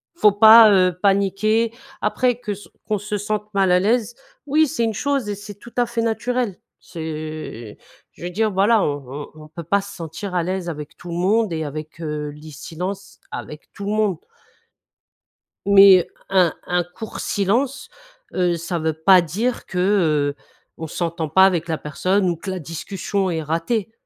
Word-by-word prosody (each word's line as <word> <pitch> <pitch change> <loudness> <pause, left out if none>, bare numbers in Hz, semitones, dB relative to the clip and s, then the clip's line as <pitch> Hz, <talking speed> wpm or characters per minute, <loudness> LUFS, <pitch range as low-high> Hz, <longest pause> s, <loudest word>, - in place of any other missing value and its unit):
Faut 210 -11 +5
pas, 220 +1 +9
heu, 185 -3 +3
paniquer. 200 +3 +2 0.3
Après, 245 +3 +1
que 215 -4 -4
s 205 +1 -12 0.2
qu'on 210 - +1
se 210 +1 -3
sente 210 +1 -4
mal 195 -2 +3
à 180 - +5
l'aise, 230 +4 +1 0.3
oui, 305 +2 +3
c'est 265 -4 -2
une 225 - -1
chose 270 0 -1
et 205 - -2
c'est 205 +1 -10
tout 235 +4 -15
à 245 - +3
fait 235 -1 -2
naturel. 230 -2 -1 0.2
C'est 155 - -7 0.4
je - - -14
veux 175 - -4
dire 215 +3 0
voilà, 205 +3 +3
on 145 -1 -2 0.3
on 155 - -12
on - - -12
peut 170 +2 -8
pas 200 +5 +1
se 200 0 -10
sentir 170 +3 -6
à 175 - +2
l'aise 185 0 -3
avec 150 -3 -7
tout 175 - -11
le - - -4
monde, 200 +3 +1
et 160 -1 -2
avec, 155 +2 -7
heu, 150 -2 -3
lis 150 +1 -11
silences, 185 +7 -6
avec 150 0 -8
tout 200 - -7
le 205 - -1
monde 210 -4 +1 1.5
mais 195 -3 +7 0.2
un 185 -4 +3
un 180 0 +1
court 180 +6 -9
silence, 240 +8 -1 0.4
heu, 180 -2 +1
ça 170 +1 -3
veut 160 0 0
pas 180 +4 +5
dire 215 +10 -2
que, 185 - -7 0.6
heu, - - -29 0.3
on 160 - -5
s'entend 165 0 -3
pas 190 +5 +6
avec 175 -3 +1
la 160 -2 -1
personne 185 +7 0
ou 170 - -2
que 190 - -7
la 185 - -4
discussion 190 +4 -3
est 165 -2 -2
ratée. 170 +8 -1
190 Hz, 185 wpm, -21 LUFS, 165-215 Hz, 1.5 s, pas